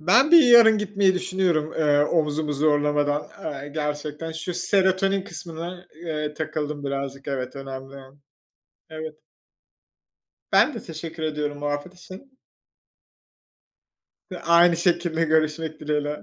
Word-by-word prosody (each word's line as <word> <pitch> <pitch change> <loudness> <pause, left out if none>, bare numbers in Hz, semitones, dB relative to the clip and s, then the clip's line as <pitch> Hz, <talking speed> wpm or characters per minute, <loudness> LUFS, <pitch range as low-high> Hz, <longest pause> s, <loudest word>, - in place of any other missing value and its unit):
Ben 240 - +4
bir 340 - +9
yarın 230 -3 +7
gitmeyi 200 -2 +1
düşünüyorum, 180 -4 0
eee, 150 -2 +2
omzumu 150 -1 0
zorlamadan. 145 0 +1 0.2
Eee, 145 -2 -5
gerçekten 150 +1 -4
şu 165 +2 -5
serotonin 195 +1 +2
kısmına, 175 +1 -8
eee, 150 -2 -4
takıldım 150 -2 -4
birazcık. 140 0 -4
Evet, 130 -1 -4
önemli. 135 0 -8 0.9
Evet. 155 -1 -7 1.4
Ben - - +4
de - - -7
teşekkür 165 0 -8
ediyorum 150 -2 -3
muhabbet 145 +4 -4
için. 190 +9 -14 1.9
Hı, 180 - -6
aynı 170 0 +5
şekilde 170 -1 +1
görüşmek 155 0 0
dileğiyle. 150 0 -2
155 Hz, 110 wpm, -24 LUFS, 150-175 Hz, 1.9 s, bir